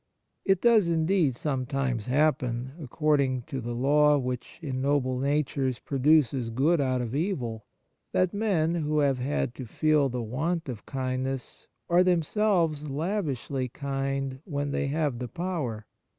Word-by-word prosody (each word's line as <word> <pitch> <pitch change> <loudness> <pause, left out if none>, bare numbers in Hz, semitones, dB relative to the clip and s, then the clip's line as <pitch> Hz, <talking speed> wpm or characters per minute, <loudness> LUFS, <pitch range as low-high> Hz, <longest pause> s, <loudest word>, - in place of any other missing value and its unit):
It 195 -2 +2
does 225 -6 +5
indeed 165 -4 +2
sometimes 130 -4 -2
happen, 130 -3 +1
according 140 -2 +1
to 135 0 -5
the 120 0 -4
law 150 +4 +4
which 125 -2 -4
in 135 -6 -3
noble 130 -2 +1
natures 140 -2 0
produces 135 -3 +2
good 145 +7 +2
out 130 -2 +1
of 120 0 -5
evil, 135 - -2 0.5
that 185 -1 +1
men 190 -6 +1
who 155 -3 -1
have 140 -3 +2
had 130 -1 -1
to 130 -2 -8
feel 150 +2 +2
the 125 -1 -3
want 160 +9 -2
of 120 -5 -7
kindness 130 -1 -3 0.2
are 175 +1 +5
themselves 170 -3 +1
lavishly 140 - -2
kind 135 0 -3
when 145 -4 -3
they 140 - -1
have 145 -4 -1
the 125 - -4
power. 155 -11 -3
140 Hz, 140 wpm, -27 LUFS, 130-160 Hz, 0.5 s, does